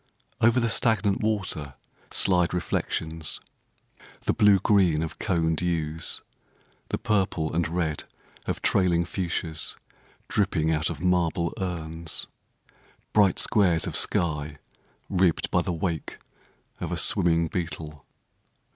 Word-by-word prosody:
Over 120 +2 +4
the 115 - +1
stagnant 110 -3 +2
water 95 -10 -1 0.3
Slide 90 -2 +2
reflections: 80 -2 -2 0.8
The - - 0
blue 105 -2 +5
green 95 -6 +3
of 80 - -6
coned 80 -5 0
yews; 80 -2 -1 0.7
The - - -1
purple 95 -6 0
and 85 0 +1
red 80 -3 -2 0.4
of - - -3
trailing 85 -3 +3
fuchsias 85 -3 -2 0.5
Dripping 90 -6 +1
out 80 -1 0
of 80 -3 -6
marble 85 -2 +1
urns; 85 -3 -3 0.9
Bright 100 -4 +4
squares 90 -6 +4
of - - -4
sky 75 -3 -1 0.5
Ribbed 90 -3 +1
by - - +3
the - - -2
wake 85 -2 -3 0.6
of - - -4
a - - -2
swimming 85 -1 +3
beetle. 80 -4 -5
85 Hz, 115 wpm, -26 LUFS, 80-95 Hz, 0.9 s, blue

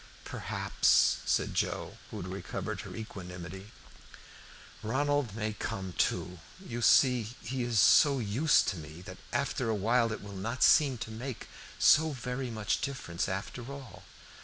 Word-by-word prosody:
"Perhaps," - - +2
said - - +1
Joe, - - -2
who - - -7
had - - -6
recovered 95 0 -5
her - - -9
equanimity, 95 -2 -8 1.1
"Ronald 135 0 0
may 110 -1 -2
come 95 -3 -5
too. 90 +1 -1 0.2
You 120 -11 -6
see 125 0 +5 0.2
he 125 +3 -3
is 120 -3 +1
so 140 +7 +6
used 125 +7 +3
to 100 - -4
me 80 +2 -10
that - - -10
after - - -1
a 110 - +1
while 115 +3 +2
it 110 - -5
will 100 0 -9
not 115 +6 -1
seem 140 -5 +5
to 110 - -6
make 120 +2 -6 0.3
so 155 0 +5
very 125 0 -4
much 110 -2 -1
difference 130 -12 -3
after 115 +7 -5
all." 140 -2 -10
115 Hz, 150 wpm, -30 LUFS, 95-130 Hz, 1.1 s, so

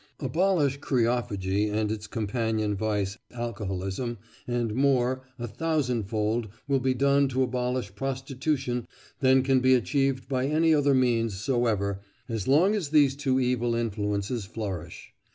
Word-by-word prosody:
Abolish 150 -1 +1
kreophagy 105 -6 0
and 105 0 0
its 110 0 -4
companion 110 -1 -1
vice, 105 0 -1 0.2
alcoholism, 105 0 -3 0.3
and 120 -3 -1
more, 130 0 +2 0.2
a 120 - -4
thousandfold, 115 -5 -1 0.2
will 140 -1 +2
be 130 0 +1
done 140 +2 +3
to 130 0 +1
abolish 125 -4 -2
prostitution 135 +1 -2 0.3
than 130 -1 +4
can 135 -1 +3
be 130 0 +5
achieved 135 +1 0
by 130 0 0
any 160 +2 +3
other 145 -2 +3
means 115 -6 +1
soever 105 -5 0 0.3
as 110 -4 -3
long 165 +10 +4
as 195 -9 -2
these 145 -3 +4
two 135 -2 +1
evil 125 -2 +1
influences 105 0 -2
flourish. 95 -5 -6
125 Hz, 135 wpm, -27 LUFS, 110-135 Hz, 0.3 s, be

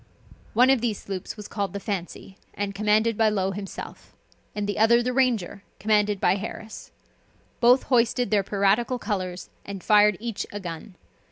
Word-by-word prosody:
One 250 +3 +6
of 265 -4 +2
these 225 -4 -1
sloops 195 +2 -6
was 210 - -8
called 200 -1 -3
the 200 - -4
Fancy, 195 -1 -5 0.2
and 200 -1 -3
commanded 215 +2 +2
by 220 -1 +5
Low 195 -2 0
himself, 195 0 -8 0.4
and 205 -1 -2
the 205 - -2
other 235 +2 +5
the 250 +1 -1
Ranger, 240 -7 0 0.2
commanded 210 -1 +2
by 190 - +2
Harris; 220 +1 -8 0.7
both 245 +2 +5
hoisted 245 -1 +1
their 210 -2 +4
piratical 200 +5 +1
colors, 185 -6 -4
and 195 -2 -8
fired 210 -2 +5
each 230 -2 -4
a 205 - -5
gun. 180 +1 -8
210 Hz, 165 wpm, -25 LUFS, 195-230 Hz, 0.7 s, One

